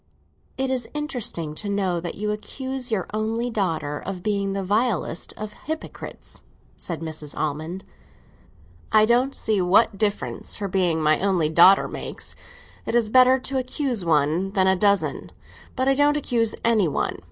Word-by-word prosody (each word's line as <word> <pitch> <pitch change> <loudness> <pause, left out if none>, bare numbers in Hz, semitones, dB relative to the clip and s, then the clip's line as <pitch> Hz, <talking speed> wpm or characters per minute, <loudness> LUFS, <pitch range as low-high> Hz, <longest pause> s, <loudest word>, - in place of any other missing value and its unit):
"It 265 0 0
is 250 -3 -2
interesting 245 - -3
to 205 +6 -4
know 190 -4 0
that 170 0 -5
you 210 +1 -2
accuse 260 +4 -4
your 200 -5 0
only 225 +3 -1
daughter 160 -8 -1
of 185 -2 -6
being 200 -2 0
the 195 0 -2
vilest 205 -3 0
of 210 0 -6
hypocrites," 315 +1 -7 0.3
said 165 -2 -5
Mrs. 155 -2 -6
Almond. 155 +5 -3 1.1
"I 215 -1 +6
don't 245 +4 +2
see 210 -3 0
what 195 +2 +3
difference 210 -1 -2
her 205 - -3
being 175 -4 +1
my 155 0 +3
only 185 -6 +1
daughter 175 +5 +6
makes. - - -7 0.5
It - - -1
is 230 -3 +2
better 255 +2 +6
to 265 +1 -1
accuse 255 - -2
one 165 +4 +1
than 190 -3 +3
a 190 0 +4
dozen. 190 -7 +1 0.4
But 260 0 0
I 270 - +5
don't 290 +2 +3
accuse 230 -6 0
any 220 -6 +4
one. 145 - -2
200 Hz, 160 wpm, -24 LUFS, 175-240 Hz, 1.1 s, I